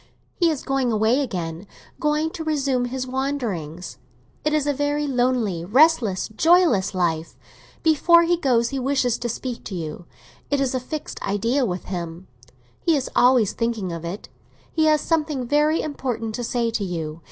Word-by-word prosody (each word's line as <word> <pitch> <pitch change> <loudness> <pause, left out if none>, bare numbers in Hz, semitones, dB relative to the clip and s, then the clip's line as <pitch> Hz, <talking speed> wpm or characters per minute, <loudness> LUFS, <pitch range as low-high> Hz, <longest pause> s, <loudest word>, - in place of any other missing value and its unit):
He 340 -2 +2
is 305 -4 -2
going 270 -3 0
away 220 +4 +2
again—going 235 - -3
to 325 - -6
resume 275 -5 0
his 255 +1 -3
wanderings. 235 - -3 0.4
It 305 - +1
is 305 -2 +1
a 290 - +1
very 290 +1 0
lonely, 245 - 0
restless, 235 - +3
joyless 240 - +3
life. 165 -3 -1 0.5
Before 335 +2 +5
he 345 +1 +3
goes 245 -8 +2
he 275 - -3
wishes 260 -2 +1
to 240 - -3
speak 245 +1 -5
to 195 - -5
you; 165 0 -6 0.4
it 285 - +1
is 270 -2 0
a 255 - 0
fixed 295 +4 -6
idea 230 +7 0
with 180 -1 -3
him—he 165 - -5
is 270 -3 -2
always 245 -5 +4
thinking 230 -6 -2
of 165 -1 -6
it. 175 +5 -6 0.5
He 315 -1 +2
has 305 -1 +4
something 305 -5 0
very 300 +4 +2
important 250 -7 -3
to 245 - -4
say 235 0 0
to 225 -2 -2
you. 165 -4 -4
245 Hz, 165 wpm, -23 LUFS, 190-290 Hz, 0.5 s, Before